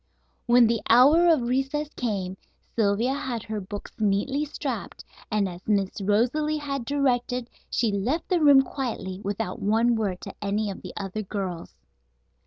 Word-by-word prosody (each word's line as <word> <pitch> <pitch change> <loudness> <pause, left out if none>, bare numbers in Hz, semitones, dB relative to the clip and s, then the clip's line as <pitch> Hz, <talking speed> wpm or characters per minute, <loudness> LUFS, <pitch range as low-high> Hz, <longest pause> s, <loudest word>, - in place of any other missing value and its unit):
When 240 0 +6
the 230 -1 +1
hour 285 +9 +7
of 315 -7 +4
recess 270 +4 -1
came 195 -6 -2 0.4
Sylvia 225 +4 +2
had 250 -5 -3
her 215 -1 -4
books 205 +2 -7
neatly 220 +8 +1
strapped, 295 - -5 0.2
and, 210 -3 +1
as 175 -1 -8
Miss 200 -2 0
Rosalie 250 +10 +1
had 275 -4 -4
directed, 250 -3 0 0.2
she 230 -3 +1
left 240 - -1
the 360 -3 +1
room 285 -3 +7
quietly 230 -8 -4
without 200 -1 -3
one 225 +4 +3
word 200 -5 -1
to 195 - -8
any 205 +1 -1
of 190 - -9
the - - -8
other 200 +1 -4
girls. 190 -4 -5
230 Hz, 155 wpm, -26 LUFS, 200-270 Hz, 0.4 s, hour